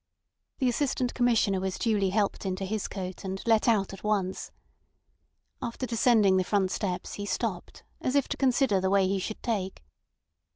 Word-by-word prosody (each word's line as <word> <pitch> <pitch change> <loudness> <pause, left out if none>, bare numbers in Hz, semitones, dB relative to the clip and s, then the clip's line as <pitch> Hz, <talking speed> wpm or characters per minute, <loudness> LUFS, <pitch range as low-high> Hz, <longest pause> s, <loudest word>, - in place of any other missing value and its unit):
The 260 - +1
Assistant 250 0 0
Commissioner 230 -6 +2
was 190 0 -3
duly 210 -4 +1
helped 205 +1 0
into 190 0 -2
his 215 +1 -2
coat, 185 -2 -6
and 190 0 -4
let 225 -1 +3
out 205 -5 +2
at 195 - -10
once. 200 -3 -1 1.1
After 235 +2 -3
descending 225 -5 +4
the 185 - +2
front 190 -1 +1
steps 180 -3 -3
he 205 - -5
stopped, 195 -2 -3 0.2
as 255 - -1
if 280 - +3
to - - -1
consider 255 -6 +2
the 190 - +1
way 195 -1 +3
he 195 +1 0
should 215 +3 -5
take. 195 - -2
205 Hz, 170 wpm, -28 LUFS, 190-235 Hz, 1.1 s, descending